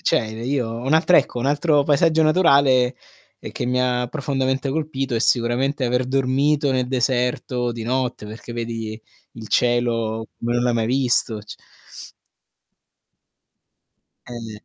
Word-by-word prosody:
cioè - - +2
io 115 +3 -3
un 120 +5 -3
altro 175 +2 +4
ecco 135 -3 +1
un 120 - -2
altro 145 +1 +2
paesaggio 160 +2 +3
naturale, 140 -6 +3 0.4
ehm, - - -8
che 125 - -4
mi 125 +1 0
ha 125 -1 0
profondamente 135 -1 -2
colpito, 135 -4 -3
è - - +1
sicuramente 130 +4 +1
aver 125 +1 +1
dormito 135 +3 +1
nel 130 -1 0
deserto 125 -1 -1
di 115 -1 -6
notte, 125 -2 -2
perché 110 +3 -9
vedi 115 -2 -5 0.3
il 110 -2 -10
cielo 115 -2 0
come 120 +1 -2
non 120 - +1
l'hai 120 -1 +1
mai 115 -1 0
visto, 125 -3 +1
c 105 +1 -11 2.7
Eh, 115 -3 -9
125 Hz, 140 wpm, -21 LUFS, 120-135 Hz, 2.7 s, altro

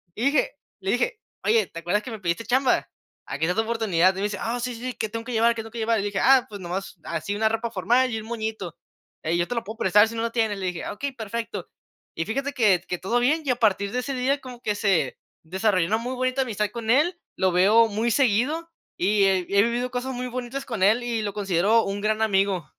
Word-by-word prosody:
y 230 - -2
dije 280 0 +2 0.3
le 190 - -1
dije: 435 - 0 0.3
"Oye, 450 0 +3
¿te 165 - -8
acuerdas 190 +5 0
que 250 - -7
me 220 - -6
pediste 180 +4 -2
chamba? 255 +3 +2 0.4
Aquí 160 - -2
está 180 - 0
tu 225 - +3
oportunidad". 205 -6 +2
Y - - -8
me 195 - -2
dice: 205 -1 -2
"Ah, 235 +1 -2
sí, 245 0 -3
sí, 250 +2 -5
¿que 220 - -3
tengo 230 +1 -5
que 250 - -6
llevar? 230 +1 +3
¿Qué 225 - -3
tengo 225 - -11
que 235 - -6
llevar?". 225 -1 +1
Y - - -4
dije: 200 -2 -2
"Ah, 265 -2 +5
pues, 205 -1 -8
nomás 185 +2 -5
así 205 - -3
una 220 - +2
ropa 225 +1 -2
formal 240 +6 +2
y 225 - -2
un 220 - -10
moñito, 220 -7 -4 0.5
eh, 165 +2 0
yo 175 - 0
te 245 - -3
lo 230 - -1
puedo 220 +1 -8
prestar 210 +1 +5
si 230 - -7
no 225 - -2
lo 230 - -1
tienes". 220 -4 +1
Le 185 - -2
dije: 175 -2 -4
"Okey, 280 +6 -4
perfecto". 230 0 -5 0.5
Y, 165 - -2
fíjate 275 +6 -2
que 205 -9 +3
que 180 - -2
todo 235 +6 0
bien, 305 +6 +2
y 270 - -2
a 250 - +1
partir 200 -4 +2
de 250 - 0
ese 275 +2 -3
día 265 +2 +1
como 250 -2 -10
que 210 -3 -1
se 190 - +1 0.3
desarrolló 185 0 +1
una 220 - +2
muy 255 - -3
bonita 255 +1 0
amistad 210 -3 -2
con 230 -2 -6
él, 315 +8 +3 0.2
lo 190 -1 +2
veo 210 +6 +5
muy 220 +3 -1
seguido, 275 +8 +1 0.3
y 200 +2 +2
he 195 -1 +4 0.2
he 200 0 +6
vivido 240 +2 -1
cosas 250 +2 -3
muy 250 0 -4
bonitas 255 +2 -5
con 225 -6 -4
él 220 +5 +4
y 235 -2 -1
lo 205 -1 -3
considero 205 +2 +2
un 200 +1 -3
gran 215 +1 0
amigo. 195 -5 +1
225 Hz, 255 wpm, -25 LUFS, 200-245 Hz, 0.5 s, he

